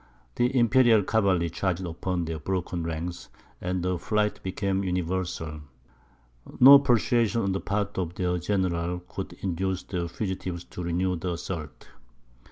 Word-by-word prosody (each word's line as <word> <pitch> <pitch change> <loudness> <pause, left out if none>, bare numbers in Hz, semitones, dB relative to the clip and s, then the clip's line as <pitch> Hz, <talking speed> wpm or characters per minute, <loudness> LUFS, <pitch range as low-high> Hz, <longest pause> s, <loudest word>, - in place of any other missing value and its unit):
The 125 - +1
imperial 120 -2 +5
cavalry 95 -6 +1
charged 95 0 -1
upon 85 +1 -2
their 80 -1 -4
broken 90 +1 -2
ranks, 85 +2 -5 0.3
and 90 0 -2
the 90 -1 -1
flight 105 +2 0
became 95 +1 -1
universal. 90 -4 -2 1.0
No 140 +2 +11
persuasion 120 -3 +2
on 100 - 0
the 95 - -2
part 100 -1 -2
of 90 -1 -3
their 90 -1 0
general 90 -2 -1
could 90 - -7
induce 95 0 -1
the 90 -3 -3
fugitives 90 -2 -4
to 90 - -9
renew 90 +1 0
the 90 +2 -3
assault. 80 -3 -6
90 Hz, 140 wpm, -27 LUFS, 85-100 Hz, 1.0 s, No